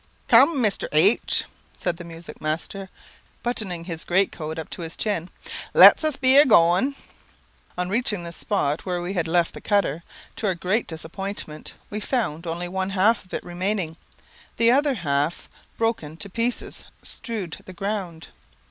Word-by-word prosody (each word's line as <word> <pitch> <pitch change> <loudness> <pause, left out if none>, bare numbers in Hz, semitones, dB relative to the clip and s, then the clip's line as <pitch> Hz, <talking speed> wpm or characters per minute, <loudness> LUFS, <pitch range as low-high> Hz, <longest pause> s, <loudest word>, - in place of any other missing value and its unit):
"Cum, 275 +7 +6
Mr. 210 -3 +1
H 185 +9 +3 0.2
," - - -24
said 175 -2 -2
the 170 - -8
music 170 0 -10
master, 170 +5 -3 0.5
buttoning 200 -8 -2
his 165 -2 -4
great 190 +2 +2
coat 160 0 -6
up 160 - -5
to - - -7
his 165 0 -6
chin, 185 -5 -1 0.5
"let - - +9
us 310 -3 +2
be 265 0 +5
a 290 - +10
goin'." 195 - +4 0.8
On 180 0 -1
reaching 210 -2 -1
the 170 - -6
spot 165 -5 -1
where 180 -2 -2
we 175 +2 -4
had 170 -4 -1
left 170 0 +2
the - - -9
cutter, 200 -7 +1 0.4
to 215 - -1
our 190 - +1
great 190 +6 0
disappointment, 160 0 -7 0.2
we 210 - -3
found 205 - -2
only 170 +2 -3
one 190 +1 -2
half 205 +4 +2
of 185 - -19
it - - -4
remaining; 180 -1 -2 0.6
the 230 0 +5
other 280 +1 +3
half, 150 -3 -1 0.3
broken 225 -10 -1
to 200 +2 -8
pieces, 235 +4 -2 0.2
strewed 210 -9 -3
the - - -9
ground. 190 -4 -4
185 Hz, 165 wpm, -24 LUFS, 165-215 Hz, 0.8 s, a